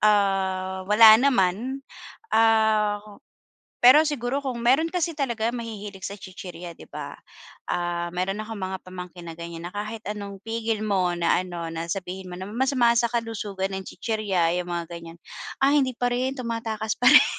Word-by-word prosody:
ah, 190 -2 +1
wala 215 +1 +9
naman. 255 +1 +1 0.5
Ah, 220 -2 +3 0.8
pero 255 +5 +9
siguro 270 -1 -1
kung 250 -4 -4
meron 275 +7 +4
kasi 345 -1 -1
talaga 240 -6 -1
mahihilig 210 -5 -6
sa 200 - -7
chichirya, 180 -3 -9
'di - - -15
ba? - - -7 0.6
Ah, 175 0 -1
meron 195 +3 -1
akong 220 +1 -6
mga 190 -1 -4
pamangkin 180 -1 -9
na 165 - -8
ganiyan, 170 0 -7
na - - -15
kahit 215 +2 -4
anong 200 -2 -6
pigil 225 0 -2
mo 195 -4 +1
na 170 -1 +2
ano, 175 -2 -5
na 165 0 -4
sabihin 185 -1 -6
mo - - -5
na 190 +2 -6
masama 240 +1 +2
sa 235 0 +2
kalusugan 205 -5 -3
ang 190 - -6
chichirya, 190 -7 0
eh, 180 - -1
yung 175 - -6
mga 170 -1 -3
ganiyan, 170 -1 -9 0.4
ay 280 +1 +4
hindi 255 - -2
pa 245 +1 -1
rin, 250 +2 0
tumatakas 230 -4 -3
pa 250 +1 +6
rin. - - +9
210 Hz, 170 wpm, -25 LUFS, 185-235 Hz, 0.8 s, wala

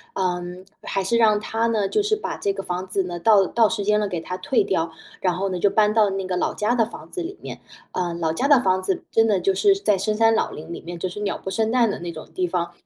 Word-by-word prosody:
嗯， 180 0 -3 0.2
还 195 - -2
是 235 +5 0
让 215 -2 +4
她 225 +2 -1
呢， 215 -4 +1
就 425 - +1
是 425 +1 +1
把 325 -6 -5
这 200 - 0
个 195 0 -5
房 180 +1 -4
子 195 0 0
呢， 175 -1 -5
到 200 0 +5
到 225 +2 +3
时 200 - -2
间 210 0 +3
了 210 - 0
给 175 -3 -3
它 180 +2 -5
退 265 +6 +1
掉， 165 -3 -1 0.3
然 180 -2 +1
后 195 +1 -1
呢， 180 -1 -3
就 200 - +3
搬 210 0 +3
到 215 -3 +4
那 195 -1 -3
个 185 -1 -2
老 - - -1
家 215 +3 +1
的 230 -3 +2
房 - - -11
子 360 - -4
里 360 +4 -6
面。 - - -8 0.3
“呃， 175 -2 -2
老 160 -2 -1
家 270 +11 0
的 285 -4 +6
房 185 -2 +2
子 190 0 -2
真 225 0 +4
的 200 -4 +2
就 195 +2 +1
是 390 - +4
在 210 - +1
深 210 +3 -1
山 225 0 +4
老 - - +1
林 160 +3 -8
里 - - -7
面， 175 +1 -7
就 185 - -2
是 180 +3 -7
鸟 205 -1 -2
不 190 - -6
生 220 +2 0
蛋 235 -3 +3
的 215 - -5
那 170 0 -5
种 155 -1 -10
地 180 -1 0
方。 170 -1 -2
195 Hz, 310 characters per minute, -23 LUFS, 180-225 Hz, 0.3 s, 的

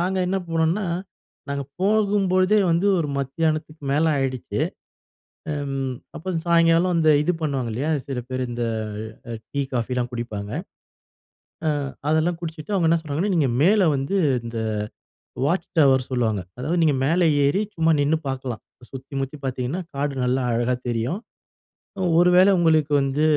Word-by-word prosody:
நாங்க 185 +2 0
என்ன 195 +1 +1
போனோம்னா 165 +5 +1 0.6
நாங்க 140 0 -2 0.2
போகும்போழுதே 200 -1 +3
வந்து, 170 +4 +2
ஒரு 155 -3 -1
மத்தியானத்துக்கு 155 +2 -2
மேலே 155 +3 +3
ஆயிடுச்சு. 130 -2 -2 0.9
அ - - -1 0.6
அப்புறம் 175 0 -3
சாயங்காலம் 170 +1 +4
அந்த 160 -1 +4
இது 175 +4 +1
பண்ணுவாங்க 135 -6 -1
இல்லையா, 135 +8 -1 0.2
சில 135 -2 -3
பேரு 130 0 -2
அ - - -7
இந்த 120 0 -2 0.9
டீ, 140 - -2
காஃபிலாம் 125 0 -1
குடிப்பாங்க. 105 -4 -5 1.4
அ - - -5 0.2
அதெல்லாம் 160 +2 +1
குடிச்சுட்டு 160 +3 -5
அவங்க 170 -4 +2
என்ன 165 0 +3
சொல்றாங்கன்னா, 160 +6 -1
நீங்க 150 -6 +2
மேலே 195 0 +5
வந்து 135 +9 -1 0.3
இந்த 115 0 -5 0.9
வாட்ச் 170 +6 0
டவர் 130 -3 +4
சொல்லுவாங்க. 115 -6 0 0.2
அதாவது, 160 +7 0
நீங்க 150 -3 +3
மேல 170 +5 +2 0.2
ஏறி 180 +9 +2
சும்மா 165 0 +3
நின்னு 150 +3 +2
பார்க்கலாம். 130 -3 -4 0.3
சுத்தி 135 +1 -10
முத்தி 135 +3 -5
பார்த்திங்கன்னா 130 +7 -2
காடு 140 +1 -1
நல்லா 125 +1 +1
அழகா 120 +2 +1
தெரியும். 120 - -1 1.0
ஒரு 175 +1 +5
வேளை 190 +2 +7
உங்களுக்கு 160 -3 +3
வந்து 135 +2 0
155 Hz, 140 wpm, -23 LUFS, 130-170 Hz, 1.4 s, வேளை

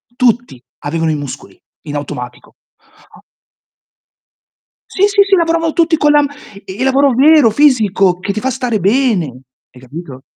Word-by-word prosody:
tutti 240 - 0 0.2
avevano 160 +2 -2
i 155 - -1
muscoli 145 -3 -9 0.3
in 145 - -5
automatico. 125 -4 -7 0.5
Ah - - -19 1.7
Sì, 380 - -6
sì, 405 0 +3
sì, 395 0 +2
lavoravano 330 -2 0
tutti 330 -1 +2
con 295 -1 +2
la 295 - +4
m 285 - -1 0.4
il 195 +7 -5
lavoro 270 +1 +2
vero, 290 0 +5
fisico, 210 -8 +2
che 200 - -3
ti 215 - -3
fa 265 +4 -2
stare 250 -4 -2
bene, 210 -1 +1 0.5
hai 125 - -17
capito? 135 0 -10
235 Hz, 150 wpm, -14 LUFS, -, 1.7 s, vero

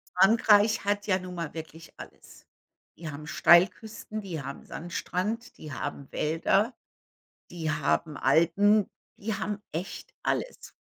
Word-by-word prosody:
Frankreich 210 +2 +5
hat 205 +1 0
ja 185 -3 +3
nun 185 0 -8
mal 170 -3 -4
wirklich 160 0 -9
alles. - - -13 0.5
Die 165 -1 -6
haben 145 +1 -8
Steilküsten, 185 +6 +3
die 175 -7 -5
haben 140 +1 -7
Sandstrand, 185 +6 -4
die 150 -3 -8
haben 140 +1 -5
Wälder, 195 - +1 0.8
die 165 -2 -3
haben 150 0 0
Alpen, 185 +8 +3 0.3
die 215 0 -3
haben 205 +1 -3
echt 175 +4 -6
alles. - - -3
180 Hz, 125 wpm, -28 LUFS, 160-205 Hz, 0.8 s, Frankreich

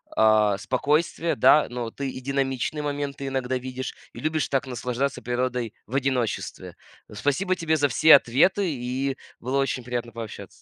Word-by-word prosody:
а, 110 -2 +4
спокойствия, 150 +8 0
да, 150 - +5
но 120 -2 -4
ты 140 +2 -4
и 130 - -7
динамичные 135 +2 -1
моменты 145 -1 -3
иногда 130 -1 -1
видишь 130 0 -6 0.2
и - - -9
любишь 155 0 0
так 135 0 -1
наслаждаться 125 +2 -2
природой 125 -2 -2
в 120 - -7
одиночестве. 130 -5 -2 0.4
Спасибо 145 - 0
тебе 160 -3 0
за 145 -1 +3
все 155 +2 +7
ответы, 140 +10 +3
и 130 +1 -2 0.2
было 130 +3 -2
очень 135 -2 -1
приятно 120 -1 -4
пообщаться! 110 -4 -7
130 Hz, 155 wpm, -25 LUFS, 120-140 Hz, 0.4 s, все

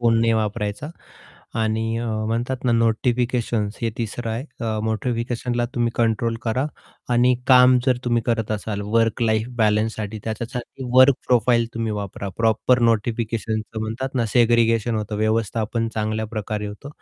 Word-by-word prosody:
Phone 115 -1 +3
नाही 115 0 +3
वापरायचा. 105 +5 -2 0.7
आणि 110 +1 0
म्हणतात 115 +3 -2
ना 125 - +3
नोटिफिकेशन्स 115 -1 0
हे 115 - 0
तिसरं 115 0 -3
आहे. 115 +4 -3 0.2
अ, 110 -2 -1
नोटिफिकेशनला 120 +2 -1
तुम्ही 120 -1 +1
कंट्रोल 115 0 +1
करा 120 +4 0 0.5
आणि 125 +1 +4
काम 125 -1 +7
जर 130 -2 +4
तुम्ही 120 -1 +1
करत 115 -3 0
असाल 105 -1 -3
वर्क 115 0 +2
लाईफ 110 -1 +1
बॅलन्ससाठी 110 0 0
त्याच्यासाठी 120 +4 -5
वर्क 130 +1 +8
प्रोफाइल 120 -1 +3
तुम्ही 115 -1 -2
वापरा 100 -1 -5
प्रॉपर 115 +2 +2
नोटिफिकेशन 110 0 -1 0.2
म्हणतात 115 +5 -4
ना 120 -3 +1
सेग्रीगेशन 115 -1 +3
होतं 105 0 -3
व्यवस्थापन 110 +1 0
चांगल्या 110 0 -1
प्रकारे 105 0 -3
होतो. 105 +7 -8
115 Hz, 140 wpm, -22 LUFS, 110-120 Hz, 0.7 s, वर्क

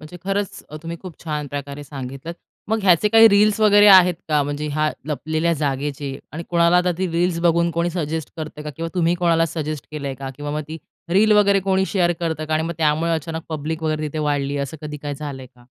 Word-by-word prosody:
म्हणजे 155 +3 -10
खरंच 195 0 -2
अ, 155 - -7
तुम्ही 165 0 -5
खूप 185 -3 -8
छान 150 -2 -3
प्रकारे 145 +1 -6
सांगितलं 135 +2 -7 0.4
मग 220 +1 +1
ह्याचे 185 +1 +4
काही 225 +1 +8
रील्स 205 0 +4
वगैरे 205 -1 +6
आहेत 185 -2 +8
का? 150 -2 +3
म्हणजे 145 +1 -3
ह्या 155 +1 +1 0.2
लपलेल्या 155 +3 -1
जागेचे. 140 -2 -3
आणि 160 +3 -5
कोणाला 170 0 +3
आता 180 0 +2
ती 190 - 0
रील्स 170 +1 0
बघून 170 0 +2
कोणी 170 +1 -1
सजेस्ट 160 -3 -3
करतंय 155 -1 -7
का? 150 - -4
किंवा 165 0 -3
तुम्ही 175 -1 +2
कोणाला 170 -2 +2
सजेस्ट 155 -3 -5
केलंय 140 -3 -4
का? 135 0 -6
किंवा 145 0 -5
मग 150 - -2
ती 160 +1 -6 0.3
रील 205 +5 +4
वगैरे 200 -1 +4
कोणी 190 0 +1
शेअर 175 -3 +1
करतं 160 -2 -2
का? 155 0 -1
आणि 155 - +1
मग 170 0 -3
त्यामुळे 160 +2 +1
अचानक 160 +1 -3
पब्लिक 160 +1 -4
वगैरे 155 -1 -1
तिथे 155 - -5
वाढली. 145 -2 -1
असं 140 +2 -4
कधी 150 -1 -5
काय 145 -1 -3
झालंय 140 -2 -7
का? 125 -1 -23
160 Hz, 215 wpm, -21 LUFS, 150-175 Hz, 0.4 s, काही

